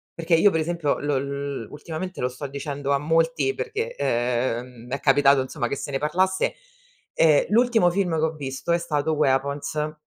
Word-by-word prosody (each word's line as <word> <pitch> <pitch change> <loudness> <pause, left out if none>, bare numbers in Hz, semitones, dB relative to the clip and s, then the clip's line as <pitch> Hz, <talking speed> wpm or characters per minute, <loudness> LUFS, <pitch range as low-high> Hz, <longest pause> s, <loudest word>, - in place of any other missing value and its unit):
Perché 165 0 -2
io 185 +5 +6
per 160 -3 0
esempio 165 -3 -1
lo 145 -1 0
l 140 -4 -4
ultimamente, 165 +5 -6
lo 125 - +1
sto 130 +3 -6
dicendo 140 0 -4
a - - +3
molti, 165 - +1
perché, 455 +3 -4
ehm, 120 - -2
è 140 +2 -2
capitato 140 -1 +4
insomma 130 -1 -3
che - - -2
se 140 +1 -6
ne 135 - -1
parlasse. 185 +6 +1 0.6
Ehm, 155 -3 +4
l'ultimo 225 -4 +4
film 180 -2 0
che - - 0
ho 160 - -1
visto 140 +1 -4
è 170 - +3
stato 150 -2 -1
Weapons, 145 +2 0
150 Hz, 180 wpm, -24 LUFS, 140-170 Hz, 0.6 s, io